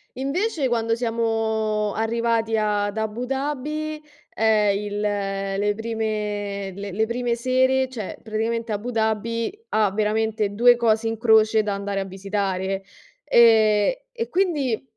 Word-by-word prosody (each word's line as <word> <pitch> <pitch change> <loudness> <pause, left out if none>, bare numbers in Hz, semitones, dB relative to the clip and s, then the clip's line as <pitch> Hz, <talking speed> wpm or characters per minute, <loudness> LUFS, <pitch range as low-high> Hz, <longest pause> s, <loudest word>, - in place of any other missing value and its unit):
invece, 285 - -1
quando 230 -1 0
siamo 220 -2 -1
arrivati 225 0 0
ad 205 0 0
Abu 220 +3 -2
Dhabi, 295 +3 -3 0.3
ehm, 210 -2 +3
il 205 0 -4
le 200 0 -1
prime 210 -3 -3
le 200 0 -6
le 220 +4 +1
prime 235 +1 -1
sere, 260 +2 +2
cioè 225 -7 -6
praticamente 225 +1 -2
Abu 215 +4 -3
Dhabi 225 - -1 0.2
ha 210 -3 +2
veramente 215 0 0
2 240 +3 +6
cose 225 -1 +1
in 225 0 -2
croce 220 -1 +4
da 205 -1 -1
andare 200 0 -3
a - - -4
visitare. 195 0 -2 0.4
E 225 - +4 0.2
e 465 - -2
quindi 300 - 0
220 Hz, 130 wpm, -23 LUFS, 205-235 Hz, 0.4 s, 2